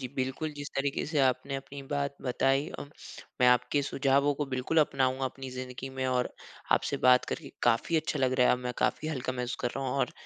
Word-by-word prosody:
जी 130 - -4
बिल्कुल, 130 +4 -2
जिस 145 0 -5
तरीके 135 0 0
से 150 0 -1
आपने 135 +1 +1
अपनी 135 +1 -8
बात 140 -1 -1
बताई 135 +2 +1
अ, - - -7 0.6
मैं 125 - +6
आपके 125 +4 +3
सुझावों 140 +1 +2
को 145 +1 -2
बिल्कुल 130 +4 0
अपनाऊँगा 135 -2 +1
अपनी 130 0 -5
ज़िंदगी 130 0 -6
में 130 0 -2
और 125 -1 +1 0.4
आपसे - - +1
बात 125 0 +6
करके 145 -5 -6
काफ़ी 120 +7 +2
अच्छा 155 -1 -1
लग 130 -1 +2
रहा 125 - +6
है - - +5
अब 125 - +1
मैं 125 - -1
काफ़ी 155 - 0
हल्का 130 -4 -2
महसूस 125 -1 -3
कर 120 - 0
रहा 135 - -2
हूँ 125 - -2
और 130 - +1
135 Hz, 215 wpm, -30 LUFS, 125-140 Hz, 0.6 s, मैं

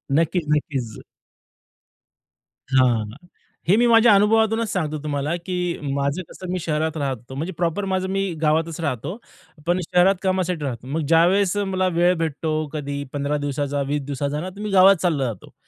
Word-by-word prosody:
नक्कीच, 165 +2 +1
नक्कीच. 135 -7 -2 1.7
हां. 125 -5 +3 0.6
हे 195 - +5
मी 240 - +4
माझ्या 230 -1 +6
अनुभवातूनच 220 +1 +3
सांगतो 155 -5 -2
तुम्हाला, 145 +2 -1
की 180 0 -3 0.2
माझं 140 +5 -1
कसं 185 -1 -7
मी 185 - -1
शहरात 160 0 -1
राहत 135 -3 -1
होतो. 125 +4 -12
म्हणजे 165 +6 -4
प्रॉपर 175 +3 -1
माझं 190 0 0
मी 195 -2 -1
गावातच 160 +1 +1
राहतो. 145 - -3 0.5
पण 175 +1 +2
शहरात 180 +3 +3
कामासाठी 185 -4 0
राहतो. 125 -2 -5
मग 155 +4 -2
ज्यावेळेस 180 +4 +4
मला 190 -2 0
वेळ 175 +1 +4
भेटतो 160 -1 -2 0.2
कधी 140 -1 -4
15 145 +1 -1
दिवसाचा, 145 0 -2
20 145 0 -1
दिवसाचा 145 +1 -2
ना, 185 - -4
तर 195 +2 -14
मी 210 - -3
गावात 195 +1 +7
चालला 155 -7 +1
जातो. 110 -6 -7
165 Hz, 160 wpm, -22 LUFS, 145-185 Hz, 1.7 s, गावात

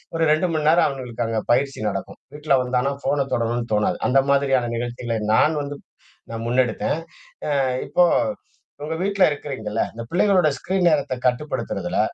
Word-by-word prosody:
ஒரு 165 - +1
2 155 +4 +2
மணி 155 -1 0
நேரம். 170 +2 +5
அவனுங்களுக்கு 125 -4 -4
அங்க 115 -1 -1
பயிற்சி 135 +3 +1
நடக்கும். 95 0 -6 0.2
வீட்ல 150 -1 +1
வந்தானா 125 +2 0
போன் 135 0 0
தொடணும்னு 115 0 -1
தோணாது. 105 0 +1
அந்த 135 +2 +4
மாரியான 135 -3 +2
நிகழ்ச்சிகளை 120 0 -3 0.2
நான் 155 +7 +4
வந்து 145 0 -5 0.5
நான் 115 0 -5
முன்னெடுத்தேன். 125 +4 0 0.6
அ - - +2 0.3
இப்போ 180 - +3 0.8
உங்க 155 +2 -3
வீட்ல 200 0 +2
இருக்கிறீங்கல்ல, 115 -7 -3
இந்த 115 - -7
பிள்ளைகளோட 185 -2 +3
ஸ்கிரீன் 185 -1 0
நேரத்த 145 -5 +1
கட்டுப்படுத்துறதுல 125 +5 -2
135 Hz, 150 wpm, -22 LUFS, 120-155 Hz, 0.8 s, நேரம்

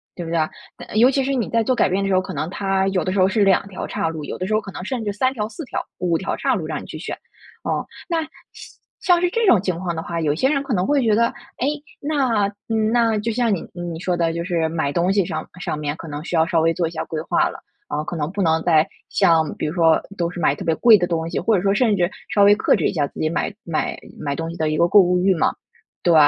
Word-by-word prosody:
对 175 - -5
不 - - -6
对 170 - +1
啊？ 155 - +1 0.3
嗯， - - -6
尤 245 +4 +6
其 270 0 +1
是 275 - 0
你 245 -5 -1
在 230 - +2
做 255 +3 +1
改 - - +3
变 190 +2 0
的 - - 0
时 195 - +2
候， 185 - +4
可 - - -7
能 155 - -3
它 195 0 0
有 190 -2 0
的 185 - -1
时 195 - 0
候 185 - +5
是 205 +2 +2
2 195 0 +3
条 190 - -6
叉 - - -2
路， 160 -2 -4
有 - - -5
的 185 - -3
时 215 - -1
候 215 - +2
可 200 - -9
能 180 - -7
甚 250 0 -3
至 205 - -1
3 255 +6 0
条、 215 -4 -3
4 320 +6 -8
条， - - -3
5 175 -2 +1
条 190 - -3
叉 265 -2 +1
路 175 -7 -3
让 155 -1 -4
你 - - -10
去 - - -8
选。 - - -5 0.5
哦， - - -1 0.2
那 335 -3 0
像 310 - -7 0.7
像 350 -2 +4
是 355 - +2
这 460 +5 0
种 215 - +6
情 185 -4 -2
况 175 -2 -3
的 160 - -3
话， 170 0 -3
有 150 -2 +1
些 260 +11 +2
人 280 -1 +1
可 265 - -3
能 180 -2 +1
会 285 +3 +2
觉 220 -3 +3
得， 235 +2 +4 0.3
诶， 260 - +1 0.3
那， 260 -9 +1 0.2
嗯， 220 -1 +1
那 230 -2 +3
就 225 +2 -2
像 230 -1 +1
你 185 - -2
你 175 -2 -5
说 180 0 -1
的 165 -1 +1
就 170 0 -3
是 170 -3 0
买 160 -3 -1
东 175 +5 +1
西 200 -2 +2
上 155 -1 -4
上 155 - -2
面 145 -1 -2
可 165 - -9
能 150 0 -6
需 175 - -3
要 160 -1 +4
稍 170 -2 +1
微 165 +1 +3
做 170 0 0
一 - - -7
下 160 - -3
规 155 -1 -4
划 - - +2
了， - - -9 0.3
啊， 150 +1 -2
可 175 - -5
能 150 -1 -2
不 200 +1 -3
能 160 -2 +2
再 160 -2 +4 0.2
像 160 -2 +3
比 - - -2
如 150 - -3
说 165 -3 +4 0.2
都 170 -1 0
是 180 - -7
买 150 -3 +2
特 - - -7
别 165 - +2
贵 230 +2 +7
的 175 -2 0
东 165 -1 -2
西， - - -2
或 225 - +2
者 185 - +1
说 195 +1 +2
甚 220 -1 +3
至 175 -1 +2 0.2
稍 205 - +5
微 205 +1 +7
克 - - +3
制 - - +1
一 - - -2
下 150 -5 0
自 - - -13
己 155 - +1
买 175 +5 -2
买 165 -2 -2 0.2
买 140 -2 -2
东 165 +1 -4
西 170 - -9
的 155 -1 0
一 155 - -1
个 170 - +4
购 205 - +6
物 180 0 +2
欲 190 +1 +3
嘛， 160 - +1 0.5
对。 175 - +4
185 Hz, 315 characters per minute, -21 LUFS, 165-220 Hz, 0.7 s, 贵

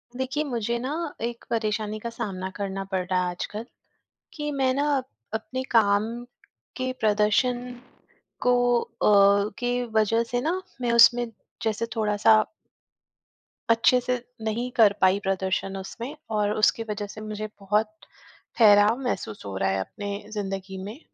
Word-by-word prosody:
देखिए 265 +4 -1
मुझे 235 -4 -2
ना 255 +3 -3 0.3
एक 235 0 -4
परेशानी 215 -1 -1
का 235 - -5
सामना 195 -5 -4
करना 195 -1 -3
पड़ 185 -1 0
रहा 180 0 +1
है 180 - -1
आजकल 210 +5 -5 0.7
कि 295 -1 -4
मैं 265 -2 +2
ना 285 +2 +1 0.5
अपने 220 +4 -3
काम 205 -3 +4 0.7
के 255 -1 -2
प्रदर्शन 220 +4 +2 0.8
को 245 -1 +3
अ, 200 0 +4
के 245 0 0
वज़ह 225 0 +2
से 245 +1 -2
न 360 +4 0 0.2
मैं 240 -1 +1
उसमें 240 +1 +6 0.4
जैसे 220 0 0
थोड़ा-सा 215 0 +4 1.3
अच्छे 230 +2 +5
से 250 - -1 0.3
नहीं 225 +3 -2
कर 215 -3 +6
पाई 190 +1 +4
प्रदर्शन 190 0 -1
उसमें 235 +8 -7 0.2
और 210 -1 +1
उसके 215 +1 +3
वज़ह 210 0 -3
से 215 - -9
मुझे 215 0 -5
बहुत 210 +2 +1 0.7
ठहराव 210 +1 +6
महसूस 180 - -4
हो 100 -1 -5
रहा 95 0 +1
है 95 0 0
अपने 205 - -5 0.2
ज़िन्दगी 195 -2 -4
में। 215 +8 -8
215 Hz, 140 wpm, -25 LUFS, 200-240 Hz, 1.3 s, उसमें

